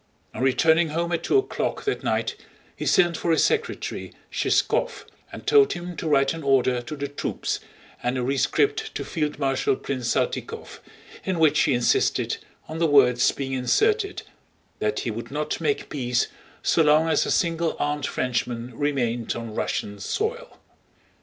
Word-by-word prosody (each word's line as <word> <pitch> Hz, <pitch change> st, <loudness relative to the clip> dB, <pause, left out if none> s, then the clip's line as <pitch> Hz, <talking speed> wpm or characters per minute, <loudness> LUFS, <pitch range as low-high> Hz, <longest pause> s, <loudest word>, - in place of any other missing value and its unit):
On -, -, -5 dB
returning 160 Hz, +5 st, +3 dB
home 170 Hz, +3 st, -1 dB
at 170 Hz, -, 0 dB
two -, -, +2 dB
o'clock 395 Hz, -, -1 dB
that 415 Hz, -, -2 dB
night -, -, 0 dB, 0.4 s
he -, -, -4 dB
sent 175 Hz, -2 st, +4 dB
for 170 Hz, -, -2 dB
his 165 Hz, -, +4 dB
secretary, 460 Hz, +1 st, -1 dB, 0.2 s
Shishkóv, -, -, 0 dB, 0.3 s
and -, -, -9 dB
told 420 Hz, -1 st, +5 dB
him 175 Hz, 0 st, -6 dB
to 160 Hz, -, -3 dB
write 135 Hz, -1 st, +3 dB
an 165 Hz, -, -6 dB
order 130 Hz, -3 st, +2 dB
to 120 Hz, +6 st, -7 dB
the 140 Hz, -1 st, -3 dB
troops 145 Hz, -, -3 dB, 0.4 s
and 125 Hz, +1 st, -1 dB
a 125 Hz, -, -1 dB
rescript 135 Hz, +2 st, +1 dB
to -, -, -3 dB
Field 150 Hz, -2 st, -2 dB
Marshal 135 Hz, -2 st, +1 dB
Prince 130 Hz, -2 st, -4 dB
Saltykóv, -, -, -3 dB, 0.4 s
in 190 Hz, -2 st, -1 dB
which 160 Hz, -2 st, +4 dB
he 140 Hz, -, +3 dB
insisted 120 Hz, 0 st, +1 dB, 0.3 s
on 160 Hz, +1 st, -6 dB
the 165 Hz, -, +3 dB
words 125 Hz, -4 st, +5 dB
being 135 Hz, -1 st, -4 dB
inserted 405 Hz, -, +1 dB, 0.6 s
that 425 Hz, -, 0 dB
he -, -, -2 dB
would -, -, -6 dB
not -, -, -3 dB
make 430 Hz, -, 0 dB
peace 125 Hz, -3 st, 0 dB, 0.3 s
so -, -, +3 dB
long 155 Hz, +1 st, +4 dB
as 160 Hz, -, +2 dB
a -, -, -2 dB
single 165 Hz, -1 st, +1 dB
armed 145 Hz, -1 st, -1 dB
Frenchman 120 Hz, -1 st, -2 dB
remained 120 Hz, -5 st, -1 dB
on 115 Hz, -2 st, -6 dB
Russian 100 Hz, -1 st, -3 dB
soil. 455 Hz, -, -3 dB
145 Hz, 165 wpm, -24 LUFS, 125-170 Hz, 0.6 s, told